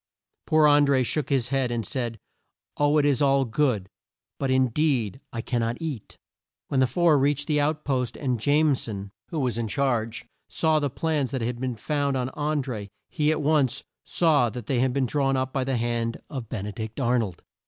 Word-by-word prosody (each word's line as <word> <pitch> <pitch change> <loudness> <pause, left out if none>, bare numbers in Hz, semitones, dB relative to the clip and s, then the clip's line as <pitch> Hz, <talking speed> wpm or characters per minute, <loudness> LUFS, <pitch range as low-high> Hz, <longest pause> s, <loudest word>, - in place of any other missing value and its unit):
Poor 155 -1 +5
An 145 0 +6
dré 130 -2 +3
shook 150 +2 -1
his 130 -4 +1
head, 135 -2 +1
and 120 -2 -2
said, 120 -5 -3 0.6
"Oh, 145 +1 +3
it 145 - +3
is 145 -1 +2
all 140 -1 +3
good, 115 -6 0 0.5
but 135 - -1
in 130 -1 +3
deed 130 -4 0
I 115 - -4
can 120 +1 -1
not 115 +1 -2
eat!" 150 -10 -6 0.5
When 135 - +1
the 130 - +4
four 160 +3 +3
reached 145 +1 +1
the 150 -1 +1
out 150 +1 -1
post 130 -4 -1
and 125 -5 -1
Jame 145 +4 +3
son, 100 -5 -5 0.2
who 165 - -3
was 125 -5 -1
in 115 - -1
charge, 120 -2 -1 0.2
saw 160 -1 +2
the 145 -1 0
plans 150 -1 -1
that 130 -2 -3
had 120 +1 -2
been 130 -2 -2
found 140 +2 -1
on 125 0 -1
An 150 -1 0
dré, 110 -6 -5 0.2
he 150 -3 +1
at 155 -1 -1
once 140 -4 +2 0.2
saw 150 -8 +3
that 120 -1 -7
they 130 0 0
had 130 +1 +2
been 135 +1 +1
drawn 135 +1 +1
up 130 0 -2
by 135 - 0
the 130 -1 -1
hand 115 0 -1
of 130 -7 -5
Ben 105 -6 -4
e 105 - -4
dict 110 +4 -6
Ar 125 -1 +2
nold. 95 -7 -4
130 Hz, 215 wpm, -25 LUFS, 120-145 Hz, 0.6 s, An